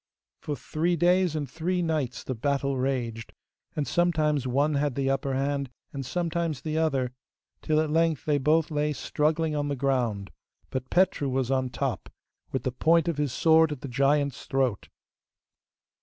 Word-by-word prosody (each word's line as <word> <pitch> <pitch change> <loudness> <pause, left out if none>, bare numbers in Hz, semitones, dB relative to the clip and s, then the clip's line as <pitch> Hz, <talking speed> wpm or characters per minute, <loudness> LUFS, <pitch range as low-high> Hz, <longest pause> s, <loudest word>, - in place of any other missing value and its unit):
For 150 - -3
three 165 +7 -1
days 175 0 +3
and 150 -2 -2
three 175 +6 -1
nights 155 -7 -1
the 130 - -3
battle 140 +3 0
raged, 125 -4 -2 0.4
and 150 -2 -1
sometimes 155 -6 +1
one 140 +4 +2
had 145 -2 0
the 135 -1 +1
upper 135 0 -1
hand, 140 0 -1 0.2
and 135 -1 -4
sometimes 170 0 -2
the 155 -1 -3
other, 135 -6 0 0.5
till 155 0 +1
at 155 -1 0
length 165 -2 +1
they 150 -2 +2
both 155 +3 +2
lay 150 0 0
struggling 155 +2 0
on 145 -1 -1
the 145 - -1
ground, 125 -7 -1 0.4
but 130 0 -4
Petru 175 -6 +2
was 130 0 0
on 130 -1 +1
top, - - -3 0.4
with 130 -2 -2
the 130 - -1
point 165 +5 +3
of 165 -3 -1
his 145 -3 0
sword 160 +2 +4
at 145 -4 -5
the - - -5
giant's 140 +2 +1
throat. 130 -6 0
145 Hz, 170 wpm, -27 LUFS, 130-160 Hz, 0.5 s, sword